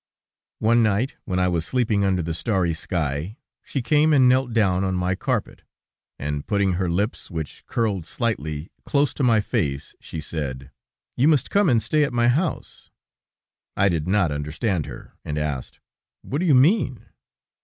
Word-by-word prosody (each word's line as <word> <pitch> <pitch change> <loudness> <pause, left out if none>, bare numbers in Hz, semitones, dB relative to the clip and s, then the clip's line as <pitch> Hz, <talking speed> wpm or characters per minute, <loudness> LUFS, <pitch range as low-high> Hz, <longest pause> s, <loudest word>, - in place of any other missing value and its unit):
One 115 +2 +3
night, 110 +4 +1
when 90 - -2
I 90 0 +2
was 85 -2 0
sleeping 110 -1 +1
under 95 -3 +1
the 80 +1 -3
starry 90 -2 0
sky, 80 - -3 0.3
she 135 - -3
came 150 +4 +3
and 130 -3 +6
knelt 130 0 +3
down 95 -5 +2
on 95 -1 0
my 90 +1 0
carpet, - - -2 0.6
and 75 0 -4
putting 100 -2 +1
her 90 0 -1
lips, 100 +7 -2
which 80 -5 -6
curled 100 -7 -1
slightly, 80 - -3
close 145 0 +1
to 140 - -2
my 115 -4 +4
face, 70 -8 -2
she 80 - -7
said: 70 -4 -5 0.4
"You 135 - +3
must 150 -5 +2
come 200 -3 +3
and 115 -4 +3
stay 150 +6 +2
at 140 - -1
my 120 0 +3
house." 155 +7 -2 0.9
I 100 - +4
did 85 -2 -1
not 95 -4 +2
understand 75 +5 -2
her, - - -10
and 75 - -4
asked: 75 -4 -4 0.4
"What 140 - -3
do 180 - 0
you 145 - +6
mean?" 135 - +3
100 Hz, 170 wpm, -23 LUFS, 80-125 Hz, 0.9 s, and